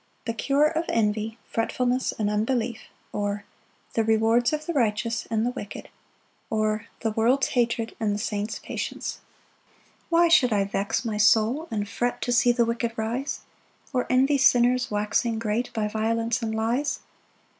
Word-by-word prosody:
The 230 - -1
cure 280 +5 +2
of 325 +2 0
envy, 220 0 0
fretfulness, 250 +2 0
and 215 - 0
unbelief; 225 +2 -1 0.3
or, 205 0 -2 0.5
The 225 - +2
rewards 225 +2 +3
of 305 0 -3
the 340 - -2
righteous, 230 -3 0
and 225 0 +1
the 245 - 0
wicked; 205 -4 -8 0.6
or, 215 0 0
The 225 - 0
world's 235 +5 +2
hatred, 230 -2 0
and 210 -3 0
the - - -2
saint's 210 0 -3
patience. - - -5 0.9
1 335 0 +4
Why - - +5
should 270 -7 +5
I 200 -1 +3
vex 200 +4 -2
my 215 -2 -2
soul 225 +8 +3
and 205 -2 -2
fret 245 +4 -2
To 245 - -1
see 245 0 +5
the 240 -1 +2
wicked 230 0 -1
rise? 235 +5 -2 0.5
Or 250 -1 0
envy 270 +3 +3
sinners 250 -1 +4
waxing 210 +2 0
great, 225 +2 -1
By 215 -1 -1
violence 225 +2 0
and 220 -1 -2
lies. 235 +6 0
230 Hz, 160 wpm, -25 LUFS, 215-245 Hz, 0.9 s, Why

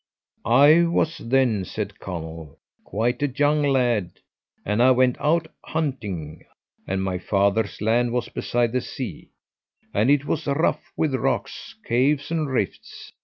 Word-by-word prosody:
"I 145 +8 +6
was 165 -1 0
then," 120 -5 +1
said - - -5
Conall, 80 -4 -7 0.3
"quite 120 +6 -1
a 145 - +2
young 145 +3 +1
lad, 125 -9 +1 0.5
and 105 +3 +1
I 125 - +6
went 130 -1 +4
out 165 +2 +2 0.2
hunting, 105 - -4 0.4
and 95 0 -1
my 95 -1 -2
father's 100 +3 0
land 115 +3 +2
was 120 -1 -1
beside 120 -1 -1
the 125 +1 0
sea, - - -7 0.6
and 110 +5 +2
it 145 0 +3
was - - -2
rough 145 +4 0
with 155 -4 0
rocks, 130 - -2
caves, 140 +5 +1
and 155 -3 -1
rifts. 120 -7 -4
120 Hz, 140 wpm, -23 LUFS, 105-145 Hz, 0.6 s, I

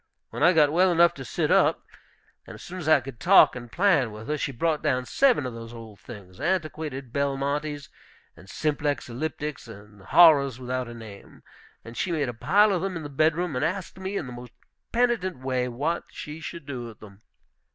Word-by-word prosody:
When - - -6
I 175 - +6
got 150 -3 +4
well 180 +3 +3
enough 170 0 +4
to 135 - -9
sit - - -2
up, - - +3 0.6
and - - -9
as - - -12
soon 185 +1 -8
as 155 -3 -3
I 155 -3 +6
could 125 -3 -10
talk 190 -6 +6
and 120 -2 -9
plan 165 - +2
with 110 +5 -10
her, 150 - +1
she 140 - -2
brought 155 +5 -1
down 130 -1 0
seven 250 - +2
of 125 - -5
these 115 0 -9
old 115 -3 -11
things, 100 -6 -12
antiquated 155 -6 -3
Belmontes 140 +1 -2 0.5
and 95 +4 -16
Simplex 145 -3 -2
Elliptics, 150 +2 -5
and 105 -2 -13
horrors 140 - +5
without 130 0 -3
a 120 - -9
name, 110 -4 -13 0.4
and 115 +1 -10
she 180 - -2
made 150 -6 -1
a - - -4
pile 205 - +3
of 180 - -1
them 190 -2 -3
in 160 - -7
the 145 - -6
bedroom, 155 +3 0
and 125 - -1
asked 185 +3 -3
me 190 +1 -4
in 155 - -3
the 125 - -8
most 120 -1 -11 0.4
penitent 235 - 0
way 130 -1 -2
what 145 +8 -2
she 150 +2 -8
should 165 -1 -8
do 130 -4 -6
with 115 -3 -11
them. 100 -1 -15
140 Hz, 205 wpm, -25 LUFS, 120-165 Hz, 0.6 s, I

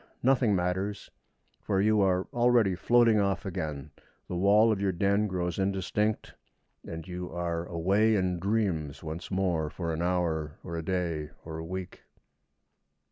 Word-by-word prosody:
Nothing 125 -5 +3
matters; 95 +3 -2 0.5
for 95 -2 0
you 105 +1 +3
are 95 -1 +2
already 120 -5 +3
floating 115 +3 +4
off 100 -3 0
again, 80 -6 -4 0.4
the 90 - -4
wall 105 +5 +5
of 100 -2 -1
your 100 -1 +2
den 100 +4 +1
grows 90 -2 -2
indistinct, 100 +2 -1 0.5
and 80 -1 -7
you 90 0 -6
are 85 0 -3
away 100 +6 +2
in 90 -3 0
dreams 95 -8 -1
once 80 +2 -6
more 90 -5 0
for 85 +1 -4
an 80 - -3
hour, 85 -4 -1
or 85 - -6
a 80 - -2
day, 85 -4 -2 0.2
or 80 0 -6
a - - -5
week. 95 +2 -6
90 Hz, 150 wpm, -29 LUFS, 85-100 Hz, 0.5 s, wall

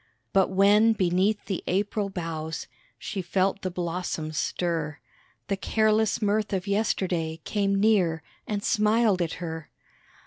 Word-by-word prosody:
But 190 -1 +4
when 205 +4 +5
beneath 190 +2 +1
the 190 - -3
April 200 +2 0
boughs 165 -4 -4 0.3
She 200 -3 -4
felt 190 +2 0
the 185 - -2
blossoms 170 -3 -3
stir, 160 -2 -1 0.5
The 200 - 0
careless 220 +1 +2
mirth 210 0 +1
of 190 0 -1
yesterday 185 -6 0
Came 200 -2 0
near 195 -6 +2 0.2
and 205 -1 -2
smiled 215 -3 +3
at 165 -2 -1
her. 160 -2 -6
190 Hz, 130 wpm, -26 LUFS, 170-210 Hz, 0.5 s, when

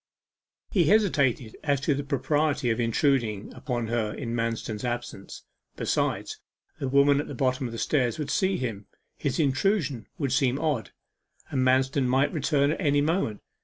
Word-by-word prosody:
He 180 -5 +3
hesitated 140 - +2
as 145 -3 +1
to 145 +1 +2
the 140 +1 -2
propriety 145 -2 0
of 110 - -1
intruding 115 -3 +1
upon 120 -4 -3
her 115 -2 0
in 115 0 -5
Manston's 115 -2 -2
absence. 120 -5 -5 0.3
Besides, - - -1 0.4
the 135 - -2
women 140 +1 +4
at 145 - -3
the 145 - -6
bottom 130 +1 0
of - - -7
the 115 - -6
stairs 125 -2 +1
would 145 -2 -3
see 190 +5 +1
him 110 -5 -4 0.3
his 140 +1 -2
intrusion 145 - +1
would 140 -4 -1
seem 135 -1 +2
odd 150 -8 -1 0.6
and 130 - 0
Manston 130 +1 +2
might 135 +3 +2
return 145 -2 +2
at 160 - -3
any 145 -3 +3
moment. 150 - 0
135 Hz, 165 wpm, -27 LUFS, 120-145 Hz, 0.6 s, women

